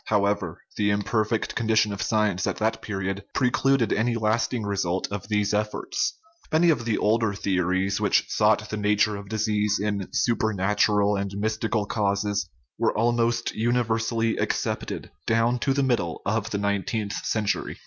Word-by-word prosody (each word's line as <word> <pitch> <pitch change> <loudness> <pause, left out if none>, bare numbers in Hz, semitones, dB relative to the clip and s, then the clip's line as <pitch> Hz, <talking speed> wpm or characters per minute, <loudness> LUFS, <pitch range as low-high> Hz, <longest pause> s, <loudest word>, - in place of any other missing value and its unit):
However, 100 -5 0 0.2
the 105 -1 +2
imper 105 +2 +1
fect 110 0 -1
condition 110 -2 +2
of 100 - -5
science 105 -4 +1
at - - -1
that 110 +1 0
period 95 -1 -3
precluded 135 -1 +2
any 115 +1 +1
lasting 115 +1 0
results 95 -2 -1
of 100 -1 -5
these 105 -1 0
efforts. 105 - -1 0.3
Many 165 +2 +5
of 120 -7 -1
the 115 -2 +1
older 110 -1 +1
theories, 95 0 0
which - - +3
sought 110 0 +2
the 110 - -2
nature 105 0 +2
of 100 0 -8
disease 105 -1 0
in 100 -2 -2
super 110 -2 +1
natural 105 +1 +2
and 100 0 -2
mystical 110 +1 -1
causes, 100 -3 -1 0.3
were - - +1
almost 120 +1 +1
universally 115 -1 0
accepted - - -2 0.2
down 115 +2 +2
to 135 - 0
the 140 0 +1
middle 115 -11 -1
of 110 +2 -1
the 105 - -2
nineteenth 100 +1 -1
century. 110 -2 -1
105 Hz, 155 wpm, -25 LUFS, 100-115 Hz, 0.3 s, Many